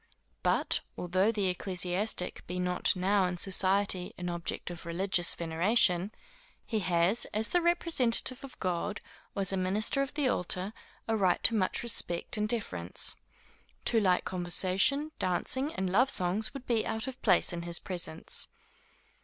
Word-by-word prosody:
But, - - +1 0.2
although 185 +4 +1
the 210 -3 -1
ecclesiastic 180 +1 -2
be 180 - -4
not 180 +2 +1
now 190 +1 +2
in 180 0 -4
society 190 0 +1
an 180 0 -4
object 170 0 -4
of 175 - -8
religious 175 0 +2
veneration, 180 +3 +2 0.5
he 220 - -1
has, 180 +3 +1
as 220 +1 0
the 355 - +2
representative 320 -8 +4
of 275 - -11
God, 185 +3 -2 0.4
or 200 - -1
as 195 - -1
a - - 0
minister 200 +8 0
of 275 0 -4
the 290 -3 +1
altar, 185 -2 0 0.3
a 225 - +1
right 190 -4 +1
to 230 - +5
much 200 -1 +1
respect 175 -7 0
and 210 0 -1
deference. 90 - -2 0.7
Too 230 - +3
light 185 -4 +2
conversation, 190 - +1
dancing 260 - -1
and 190 - -1
love 235 +9 +3
songs, 185 +1 +1
would 275 -2 -9
be 230 -3 +1
out 220 +1 -3
of 265 -1 -8
place 185 -4 +3
in 170 - -4
his 170 0 0
presence. 175 -4 -4
190 Hz, 155 wpm, -30 LUFS, 180-225 Hz, 0.7 s, to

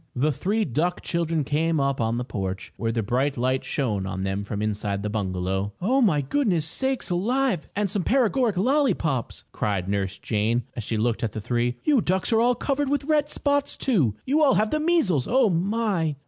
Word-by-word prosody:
The 145 +5 +2
three 205 - 0
duck 165 +7 -1
children 165 -2 -1
came 155 +3 0
up 140 -2 0
on 115 +1 0
the 125 - -2
porch, 95 -4 -5
where 115 -1 -2
the 115 -1 -1
bright 130 +6 0
light 130 +2 0
shone 105 -9 -2
on 95 0 -4
them 95 +1 -2
from 100 0 -4
inside 105 -1 -2
the 105 - -2
bungalow. 95 -1 -2
"Oh, 255 +9 +2
my 170 - +3
goodness 200 - +1
me 220 - -1
sakes 265 -8 -3
alive 230 - 0
and 205 0 +1
some 200 +1 -1
paregoric 245 -3 +2
lollypops!" 190 - 0
cried 95 -3 -2
Nurse 100 -1 -2
Jane, 115 +2 0
as 115 - -4
she 110 +2 -2
looked 115 +1 0
at 110 - -1
the 110 - -4
three. 120 +2 -1
"You 285 -6 +3
ducks 190 +5 0
are 225 - +4
all 245 +1 +3
covered 275 +3 -1
with 285 -1 0
red 300 0 +1
spots, 285 -1 0
too! 155 - +1
You 295 +4 +2
all 275 - +5
have 215 +1 +1
the 305 - +1
measles! 300 - +2
Oh, 250 -4 +3
my!" 185 -3 0
155 Hz, 205 wpm, -25 LUFS, -, -, all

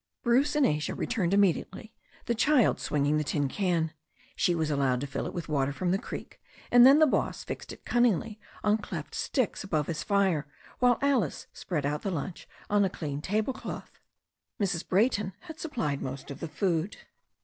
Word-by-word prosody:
Bruce 265 +5 +3
and 295 -2 +4
Asia 150 0 0
returned 200 -8 -1
immediately, 200 +3 +1 0.3
the 235 - +1
child 260 0 +3
swinging 145 +1 +1
the - - 0
tin 145 -1 0
can. 165 -1 0 0.4
She 175 - +2
was 160 -2 0
allowed 135 -3 +1
to - - -2
fill 140 - -4
it - - -6
with 175 - -4
water 140 -3 +1
from 175 +5 -1
the 190 - +1
creek, - - -8 0.3
and 245 +1 +9
then 275 +2 +8
the 310 - +7
boss 285 - 0
fixed - - -6
it - - -12
cunningly 225 -3 +1 0.2
on 210 +1 +3
cleft - - -6
sticks 255 -7 -1
above 155 -6 0
his 155 -1 -3
fire, 190 -8 +1 0.3
while 245 -1 +4
Alice 255 - +1
spread 155 -6 -3
out 150 +1 -1
the 200 - -2
lunch 170 0 -5 0.2
on 205 0 +3
a 195 - +2
clean 145 -5 -5
table 215 - 0
cloth. 260 - -8 0.6
Mrs. 185 -4 -1
Brayton 205 -1 +2
had 320 0 -10
supplied 155 - -2
most 135 +1 -6
of 140 - -8
the 165 - -4
food. 170 +3 -1
185 Hz, 185 wpm, -29 LUFS, 150-225 Hz, 0.6 s, and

